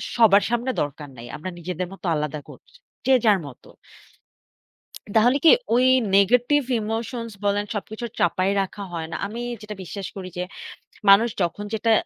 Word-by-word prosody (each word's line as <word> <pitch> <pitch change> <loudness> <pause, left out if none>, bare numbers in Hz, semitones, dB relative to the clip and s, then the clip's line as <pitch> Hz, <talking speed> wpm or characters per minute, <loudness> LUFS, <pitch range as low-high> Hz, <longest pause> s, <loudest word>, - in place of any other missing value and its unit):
সবার 210 -4 +6
সামনে 240 +2 0
দরকার 145 0 -5
নাই। 115 - -9
আমরা 155 +5 -6
নিজেদের 180 +1 -4
মত 195 - -14
আলাদা 150 0 -3
করছি। - - -16 0.3
যে, 265 - +4
যার 210 -3 +5
মত। 130 - -13 1.5
তাহলে 245 +5 +5
কি - - +10 0.3
ওই 250 +1 +4 0.3
negetive 245 +7 +4 0.2
emotions 230 +2 -4
বলেন 205 +1 +1
সবকিছু 215 +3 -5
চাপায় 185 +3 +2
রাখা 195 +1 -5
হয় 165 -1 -4
না। - - -4
আমি 225 +4 -6 0.2
যেটা 215 0 -7
বিশ্বাস 195 +1 -6
করি 185 -1 -6
যে, 180 - -1 0.7
মানুষ 220 +4 +7
যখন 175 +4 -1
যেটা 225 +1 +1
205 Hz, 155 wpm, -23 LUFS, 180-230 Hz, 1.5 s, কি